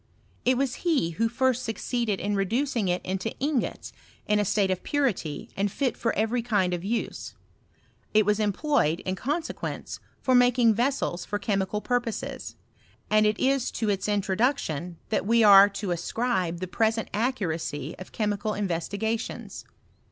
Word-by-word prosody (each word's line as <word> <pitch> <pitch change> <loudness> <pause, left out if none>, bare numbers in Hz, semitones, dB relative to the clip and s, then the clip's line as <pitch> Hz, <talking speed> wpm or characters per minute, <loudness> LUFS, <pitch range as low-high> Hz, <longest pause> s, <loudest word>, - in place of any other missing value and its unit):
It 255 0 +3
was 265 -1 0
he 305 - +1
who 225 +7 0
first 255 +1 +1
suc 225 -3 -3
ceeded 235 -5 -1
in 205 +2 -1
reducing 230 +3 0
it 180 0 -1
into 190 +4 -3
ingots 280 -2 -2 0.3
in 210 0 +2
a - - +3
state 195 -1 +2
of 185 - -1
puritj 240 - -1
and 200 0 0
fit 265 +2 -1
for 230 - 0
every 225 +3 +1
kind 205 -6 +1
of 175 -1 -3
use: 230 +4 -3 0.8
it 215 -1 +4
was 210 +1 +2
employed, 205 - +1
in 185 - -2
consequence, 295 - -4 0.2
for 260 - +1
making 245 -2 +5
vessels 240 -6 0
for 205 - -3
chemical 200 0 -1
pur 245 +1 +1
poses; 230 -2 -5 0.6
and 215 0 +5
it 210 0 0
is 270 -1 +2
to 220 -2 -1
its 200 +1 -2
introduction 195 - 0
that 215 - 0
we 230 0 +4
are 200 -1 +9
to 195 -1 -4
ascribe 180 -1 -1
the 185 - -2
present 225 +4 0
accuracy 170 - -2
of 185 - -10
chemical 210 0 -1
investiga 205 +4 -1
tions. - - -7
215 Hz, 160 wpm, -26 LUFS, 190-245 Hz, 0.8 s, are